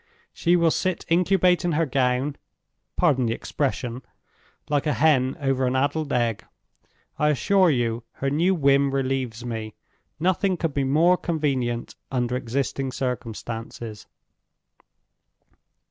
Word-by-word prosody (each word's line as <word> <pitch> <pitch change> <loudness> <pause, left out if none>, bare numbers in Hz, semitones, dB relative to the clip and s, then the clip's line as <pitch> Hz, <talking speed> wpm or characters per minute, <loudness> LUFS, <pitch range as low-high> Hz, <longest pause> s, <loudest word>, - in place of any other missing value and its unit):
She 175 0 +2
will 170 -2 +3
sit 185 +1 -1
incubating 180 0 +3
her 165 +2 +2
gown—pardon 135 +1 -1
the 115 - 0
expression—like 135 +2 -4
a 150 - +2
hen 135 -4 +2
over 135 -2 +1
an 125 - 0
addled 145 +3 0
egg. 120 -3 0 0.8
I 150 - +3
assure 185 +5 +3
you, 120 -4 0
her 135 0 -2
new 175 +6 +2
whim 140 -2 +3
relieves 130 -3 -2
me. 110 -2 -5 0.4
Nothing 185 +2 +1
could 165 -3 -2
be 140 - 0
more 165 +7 +4
convenient, 135 -9 -1 0.2
under 125 -1 0
existing 130 +2 -2
circumstances." 115 -3 -5
135 Hz, 115 wpm, -24 LUFS, 125-160 Hz, 0.8 s, more